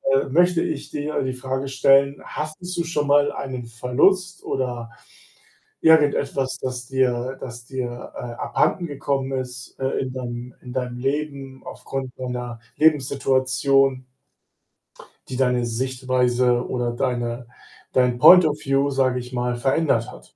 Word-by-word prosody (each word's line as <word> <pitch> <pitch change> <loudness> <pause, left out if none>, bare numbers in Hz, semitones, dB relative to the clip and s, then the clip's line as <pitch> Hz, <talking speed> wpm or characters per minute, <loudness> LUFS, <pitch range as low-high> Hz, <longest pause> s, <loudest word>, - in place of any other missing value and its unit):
äh, 135 - +3
möchte 175 +4 +3
ich 140 - -4
dir 150 +1 -2
die 130 0 -2
Frage 130 +1 -3
stellen: 135 +1 +4
Hattest 175 +4 -6
du 170 - +1
schon 150 -3 -1
mal 145 0 +4
einen 130 -3 -5
Verlust 165 - +1
oder 120 -3 -3 0.9
irgendetwas, 140 -4 +3
das 125 -1 -4
dir 130 0 0
das 120 -2 -8
dir, 125 -2 -5
äh, - - -7
abhandengekommen 135 +2 -1
ist, 125 -1 -8
äh, 135 - 0
in 130 - -3
deinem 120 -1 -6
in 125 - -10
deinem 125 -1 -3
Leben 135 -1 -3
aufgrund 135 -1 -6
deiner 125 -2 -5 0.2
Lebenssituation 135 -2 +2 1.2
die 130 - -5
deine 125 -2 +2
Sichtweise 125 0 +1
oder 120 -1 -1
deine 120 -1 -2 0.4
dein 125 -1 +2
Point 180 +5 +9
of 150 -1 0
View, 135 +1 +2
sage 130 -2 +1
ich 125 +1 -9
mal, 125 0 -1
verändert 135 -2 +1
hat. 65 0 -16
130 Hz, 135 wpm, -23 LUFS, 125-140 Hz, 1.2 s, Point